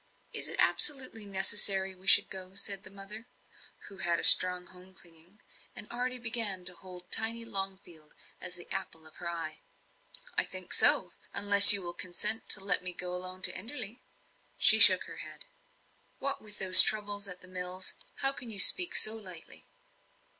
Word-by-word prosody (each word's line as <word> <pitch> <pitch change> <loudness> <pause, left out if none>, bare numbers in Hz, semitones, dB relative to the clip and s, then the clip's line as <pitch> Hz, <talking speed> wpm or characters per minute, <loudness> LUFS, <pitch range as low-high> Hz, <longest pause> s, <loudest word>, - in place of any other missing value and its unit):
"Is - - -3
it - - -9
absolutely 255 -7 -1
necessary 195 0 -1
we 185 +1 -17
should - - +4
go?" 190 0 -11
said 200 0 -5
the 185 - -10
mother, 200 +4 -14 0.6
who 195 - -18
had 175 -2 -5
a - - -9
strong 180 0 +5
home 185 +1 -20
clinging, 170 +4 -16 0.4
and 210 - -11
already 250 +1 -7
began 225 -6 -2
to 180 - -10
hold 180 -1 -18
tiny 230 +1 -5
Longfield 190 -7 -11 0.2
as 180 - -9
the 175 - -14
apple 165 -4 -9
of 155 - -19
her 170 - -9
eye. 165 -2 -10 0.7
"I - - 0
think - - -8
so, - - +2 0.2
unless 200 0 +8
you 200 -2 +1
will 175 0 -11
consent 210 +5 -1
to - - +3
let 190 -2 +1
me 180 0 -4
go 180 0 -7
alone 185 +1 -10
to - - +3
Enderley." 230 +2 -8 0.6
She - - +2
shook - - +6
her - - -16
head. - - -13 0.7
"What, 275 0 -8
with 210 -1 -11
those 185 -1 +8
troubles 205 -1 -3
at 180 -2 -10
the 185 - -13
mills? 185 0 -5 0.3
How 270 -1 +1
can 250 -4 -13
you 215 - -8
speak 360 - +5
so 215 - +2
lightly?" 185 -7 -15
195 Hz, 175 wpm, -25 LUFS, 180-215 Hz, 0.7 s, unless